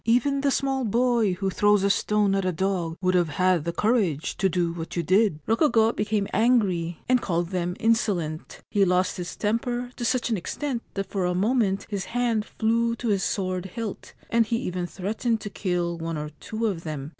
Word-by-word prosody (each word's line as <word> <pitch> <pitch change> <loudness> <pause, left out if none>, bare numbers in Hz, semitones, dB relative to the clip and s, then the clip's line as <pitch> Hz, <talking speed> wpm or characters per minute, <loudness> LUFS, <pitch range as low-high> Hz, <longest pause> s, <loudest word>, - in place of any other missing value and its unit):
Even 250 +5 +2
the 285 - +2
small 270 -1 0
boy 235 -2 +2
who 190 +1 -2
throws 205 0 +3
a 200 - +3
stone 205 0 +2
at 195 0 +1
a 185 - +1
dog 175 -2 -1
would 185 0 +2
have 175 -3 +2
had 180 +1 +2
the 170 - 0
courage 195 - 0
to 190 - +2
do 175 -2 0
what 165 -1 -6
you 170 - 0
did!' 190 -1 +3
Rokugo 225 -2 +3
became 210 -1 -1
angry, 190 -7 +2
and 255 -1 +3
called 170 -2 -1
them 180 -1 -1
insolent. 195 -9 0
He 205 - +3
lost 180 0 +2
his 175 -1 -5
temper 240 +3 -1
to - - -4
such 245 0 0
an 220 - +2
extent 245 +7 -3
that 195 -1 -1
for 190 -3 0
a 180 0 0
moment 205 0 +1
his 200 -2 -3
hand 235 -3 0
flew 230 +1 0
to 235 0 -3
his 200 -2 +2
sword 185 -2 -2
hilt, 215 +2 -6 0.2
and 230 -1 +3
he 230 - 0
even 180 -1 -3
threatened 220 +5 -2
to 205 - -6
kill 175 -3 -2
one 165 -1 -3
or 150 0 -4
two 225 +1 -3
of 185 -6 -1
them. 150 -3 -5
200 Hz, 200 wpm, -25 LUFS, 180-230 Hz, 0.2 s, throws